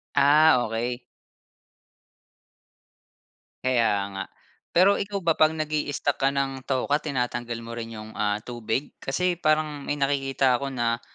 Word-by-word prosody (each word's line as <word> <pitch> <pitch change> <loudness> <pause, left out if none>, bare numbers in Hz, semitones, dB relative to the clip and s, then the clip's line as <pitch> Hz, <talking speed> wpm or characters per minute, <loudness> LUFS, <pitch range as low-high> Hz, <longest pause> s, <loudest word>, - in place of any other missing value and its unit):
Ah, 145 -1 +5
okey. 120 +3 -3 2.6
Kaya 120 -4 +3 0.2
nga 95 - -3 0.5
pero 185 +4 +5
ikaw 200 -3 -3
ba 165 - +4
'pag 155 +1 +3
nag-i-stock 150 -2 -1
ka 135 - +4
ng 135 -1 -2
tokwa 140 +3 0
tinatanggal 120 -4 -2
mo 115 - -7
rin 115 -1 -6
'yong 110 0 -9
ah 105 0 0
tubig 120 +2 -3
kasi 180 +6 0
parang 155 -3 0
may 145 +1 -3
nakikita 135 -2 +1
ko 140 - -2
na, 120 -2 -1
135 Hz, 130 wpm, -25 LUFS, 120-150 Hz, 2.6 s, Ah